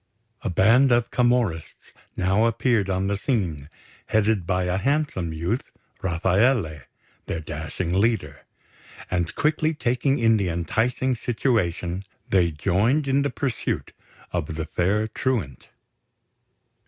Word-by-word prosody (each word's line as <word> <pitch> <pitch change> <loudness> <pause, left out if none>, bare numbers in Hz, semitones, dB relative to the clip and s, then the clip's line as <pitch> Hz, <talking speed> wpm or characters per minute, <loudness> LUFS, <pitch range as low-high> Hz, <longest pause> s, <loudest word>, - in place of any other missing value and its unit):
A 115 - -2
band 115 +9 +4
of 120 0 +2
Camorrists 120 -10 0 0.3
now 95 +4 +2
appeared 115 -3 +1
on 95 0 0
the 100 +1 0
scene, 90 - -2 0.4
headed 110 -4 +1
by 90 0 +1
a 90 +1 0
handsome 140 - 0
youth, 85 +10 -1 0.4
Rafaele, 95 - +1 0.4
their 80 - -2
dashing 80 +2 -4
leader; 95 -8 0 0.7
and 85 -2 -1
quickly 155 +1 +1
taking 135 +1 +1
in 115 -1 +4
the 100 -3 0
enticing 110 +10 0
situation, 100 -7 -1 0.2
they 90 -3 +3
joined 105 - +1
in 135 +1 +2
the 140 - 0
pursuit 135 -5 -3 0.4
of 80 -3 -3
the 80 0 -3
fair 100 +7 0
truant. 110 - -2
100 Hz, 120 wpm, -24 LUFS, 85-120 Hz, 0.7 s, band